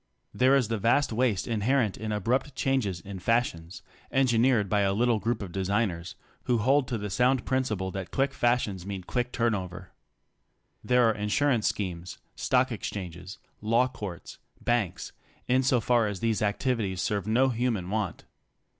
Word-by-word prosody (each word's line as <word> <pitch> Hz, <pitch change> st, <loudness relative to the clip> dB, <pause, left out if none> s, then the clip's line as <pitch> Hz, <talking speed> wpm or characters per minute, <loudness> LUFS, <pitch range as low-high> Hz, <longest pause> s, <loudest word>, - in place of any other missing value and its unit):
There 130 Hz, +2 st, +4 dB
is 130 Hz, -5 st, +2 dB
the 115 Hz, -2 st, -1 dB
vast 120 Hz, +4 st, +2 dB
waste 115 Hz, -5 st, +1 dB
inherent 115 Hz, 0 st, +1 dB
in 110 Hz, 0 st, -5 dB
abrupt 125 Hz, +7 st, -1 dB
changes 115 Hz, -12 st, 0 dB
in 95 Hz, +1 st, -8 dB
fashions, 95 Hz, -5 st, -1 dB, 0.3 s
engineered 125 Hz, -4 st, +3 dB
by 105 Hz, +2 st, +1 dB
a 95 Hz, -1 st, +2 dB
little 120 Hz, 0 st, +2 dB
group 115 Hz, +1 st, -1 dB
of 95 Hz, -, -7 dB
designers, 95 Hz, -2 st, -1 dB, 0.3 s
who 125 Hz, -, +2 dB
hold 130 Hz, +4 st, +2 dB
to 120 Hz, -, -2 dB
the 105 Hz, -1 st, -5 dB
sound 125 Hz, +3 st, +2 dB
principle 110 Hz, -8 st, -1 dB
that 95 Hz, -1 st, -5 dB
quick 135 Hz, 0 st, 0 dB
fashions 120 Hz, -7 st, 0 dB
mean 95 Hz, -1 st, -5 dB
quick 125 Hz, +6 st, -2 dB
turn 120 Hz, -2 st, +1 dB
over. 90 Hz, -2 st, -6 dB, 0.9 s
There 125 Hz, -1 st, +4 dB
are 110 Hz, -, +3 dB
insurance 110 Hz, +3 st, +1 dB
schemes, 90 Hz, -3 st, -4 dB, 0.2 s
stock -, -, +1 dB
exchanges, 90 Hz, -1 st, -6 dB, 0.2 s
law 115 Hz, +4 st, +3 dB
courts, 100 Hz, -8 st, -8 dB, 0.2 s
banks, 120 Hz, -6 st, -1 dB, 0.4 s
insofar 125 Hz, -3 st, +3 dB
as 100 Hz, -2 st, -4 dB
these 110 Hz, -2 st, 0 dB
activities 105 Hz, -2 st, -1 dB
serve 100 Hz, +1 st, -1 dB
no 125 Hz, +5 st, +3 dB
human 115 Hz, -6 st, -1 dB
want. 105 Hz, -4 st, -2 dB
110 Hz, 155 wpm, -28 LUFS, 95-125 Hz, 0.9 s, There